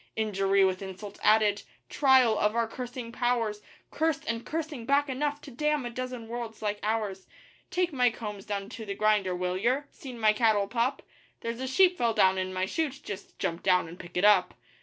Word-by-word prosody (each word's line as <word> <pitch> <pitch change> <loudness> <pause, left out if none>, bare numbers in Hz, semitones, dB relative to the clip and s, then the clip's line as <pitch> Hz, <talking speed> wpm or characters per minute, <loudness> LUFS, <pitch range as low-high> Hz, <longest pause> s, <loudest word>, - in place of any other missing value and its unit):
Injury 195 -2 +2
with 185 0 0
insult 195 +1 -8
added 210 -1 +4 0.3
trial 260 - +4
of 210 +1 +1
our 230 -1 +1
cursing 245 0 -6
powers 235 -4 0 0.3
Cursed 320 -1 0
and 230 0 -2
cursing 310 -5 -4
back 285 +1 +3
enough 290 +2 -1
to 280 - -11
damn 300 +1 0
a 240 - -4
dozen 250 -1 -5
worlds 230 -1 -6
like 205 0 -1
ours. 210 -3 -2 0.4
'Take 360 -2 0
my 250 -2 +4
combs 210 -4 -7
down 200 -1 -3
to 225 - -8
the 200 -2 -5
grinder, 210 -4 +2
will 180 0 -2
yer?' 250 +8 +1
'Seen 255 -4 -9
my 215 -1 +4
cattle 215 -2 +2
pup?' 245 +5 -1 0.4
'There's 230 +1 -4
a 260 - -2
sheep 360 +7 +4
fell 230 -2 +1
down 190 -3 +4
in 185 0 -2
my 185 0 -1
shoot 290 - -2
just 200 -1 -8
jump 170 +1 -2
down 180 -3 +3
and 170 +2 -11
pick 175 0 -8
it 185 - +3
up. 200 -4 +5
225 Hz, 200 wpm, -28 LUFS, 200-255 Hz, 0.4 s, up